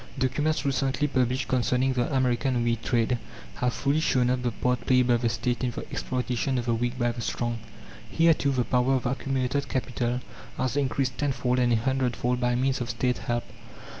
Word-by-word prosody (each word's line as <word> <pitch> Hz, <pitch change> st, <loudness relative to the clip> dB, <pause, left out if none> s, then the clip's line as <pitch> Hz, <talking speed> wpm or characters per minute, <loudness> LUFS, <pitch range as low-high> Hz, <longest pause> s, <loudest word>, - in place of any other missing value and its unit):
Documents 145 Hz, +5 st, 0 dB
recently 135 Hz, +1 st, +1 dB
published 130 Hz, -1 st, 0 dB
concerning 130 Hz, +1 st, +1 dB
the 125 Hz, +1 st, 0 dB
American 130 Hz, -1 st, +1 dB
wheat 115 Hz, -1 st, 0 dB
trade 120 Hz, +1 st, +1 dB, 0.4 s
have 125 Hz, 0 st, +1 dB
fully 140 Hz, +6 st, 0 dB
shown 125 Hz, -5 st, +2 dB
up 125 Hz, 0 st, 0 dB
the 125 Hz, -, 0 dB
part 125 Hz, +2 st, -1 dB
played 125 Hz, -1 st, +4 dB
by 120 Hz, -1 st, +4 dB
the 120 Hz, 0 st, 0 dB
State 120 Hz, +1 st, -1 dB
in 125 Hz, -, +1 dB
the -, -, -6 dB
exploitation 125 Hz, +1 st, -1 dB
of 120 Hz, -, -2 dB
the 120 Hz, -, +1 dB
weak 120 Hz, +2 st, -1 dB
by 120 Hz, -1 st, +1 dB
the 120 Hz, 0 st, -6 dB
strong. 120 Hz, 0 st, -2 dB, 0.5 s
Here, 165 Hz, 0 st, +4 dB
too, 140 Hz, -, 0 dB
the 130 Hz, -2 st, +1 dB
power 125 Hz, +2 st, +2 dB
of 130 Hz, -, -2 dB
accumulated 135 Hz, +2 st, -1 dB
capital 125 Hz, -1 st, -1 dB, 0.4 s
has 130 Hz, +1 st, -1 dB
increased 135 Hz, -2 st, 0 dB
tenfold 130 Hz, -3 st, 0 dB
and 120 Hz, -1 st, +3 dB
a -, -, +5 dB
hundredfold 125 Hz, 0 st, 0 dB
by 125 Hz, 0 st, +2 dB
means 130 Hz, +1 st, 0 dB
of 120 Hz, -, -3 dB
State 125 Hz, +2 st, 0 dB
help. 120 Hz, 0 st, -2 dB
125 Hz, 195 wpm, -27 LUFS, 120-130 Hz, 0.5 s, a